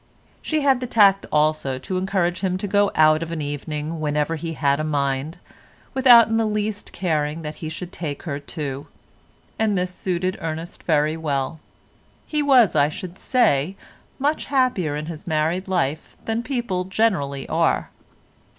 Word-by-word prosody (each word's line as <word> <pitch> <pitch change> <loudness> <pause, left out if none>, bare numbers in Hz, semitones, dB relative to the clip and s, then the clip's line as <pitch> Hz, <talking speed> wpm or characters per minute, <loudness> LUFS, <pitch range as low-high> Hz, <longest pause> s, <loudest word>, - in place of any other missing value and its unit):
She 310 -1 -1
had 270 -3 +3
the 250 - -4
tact 200 -4 +4
also 150 -3 +1
to 185 +8 -4
encourage 185 -2 0
him 185 -1 -1
to 205 - -4
go 205 +1 +3
out 155 0 +5
of 165 0 -4
an 165 - -3
evening 150 +2 -4
whenever 150 +1 0
he 165 +1 -5
had 140 -2 +1
a - - -1
mind, 140 0 -1 0.6
without 250 -3 +7
in 225 0 0
the 225 -1 +2
least 210 0 -3
caring 160 -3 -1
that 150 0 -4
he 155 - -4
should 175 +3 -7
take 150 -5 -5
her 145 -4 -3
too—and 150 +8 -5
this 180 0 -2
suited 185 0 -2
Ernest 165 +1 -5
very 155 -1 +1
well. 145 -1 -2 0.7
He 300 -1 -1
was, 260 -7 +5
I 145 +1 +4
should 180 +4 -8
say, 185 - +2 0.4
much 290 +3 0
happier 250 - +1
in 150 +1 -4
his 160 0 -8
married 160 +4 0
life 165 -5 -2
than 225 +1 -1
people 235 -8 -2
generally 185 -10 0
are. - - +1
170 Hz, 160 wpm, -22 LUFS, 150-205 Hz, 0.7 s, without